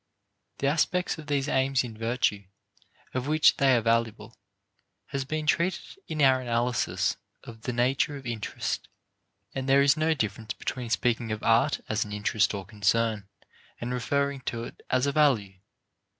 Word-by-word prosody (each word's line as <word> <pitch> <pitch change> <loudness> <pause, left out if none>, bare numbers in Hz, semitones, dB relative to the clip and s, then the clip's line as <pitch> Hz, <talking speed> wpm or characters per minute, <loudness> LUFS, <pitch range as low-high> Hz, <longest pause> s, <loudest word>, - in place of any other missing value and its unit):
The - - -3
aspect 165 +4 +1
of 155 - -10
these 140 -1 0
aims 135 -1 +2
in 115 -3 -7
virtue 115 -3 0 0.7
of 130 +1 -2
which 155 +1 +4
they 135 -2 +4
are 120 - +2
valuable 115 -1 0 0.7
has 135 -2 -3
been 155 +2 -3
treated 170 +4 0
in 155 -2 -1
our 130 -1 +5
analysis 120 0 0 0.3
of 115 -1 -11
the 125 - -3
nature 130 +4 +1
of 135 - -12
interest, 115 -3 -3 0.7
and 135 0 -3
there 140 +1 +6
is 140 +1 +5
no 160 +1 +1
difference 110 -4 -3
between 125 -2 -4
speaking 115 0 0
of 110 -1 -4
art 115 +1 +3
as 110 -1 0
an 105 - -8
interest 105 0 +1
or 95 -1 -5
concern 105 0 0 0.5
and 120 +1 -3
referring 140 +2 -1
to 115 -1 -5
it - - -10
as 130 +1 +2
a 140 - +1
value. 115 -11 +2
125 Hz, 165 wpm, -27 LUFS, 115-140 Hz, 0.7 s, there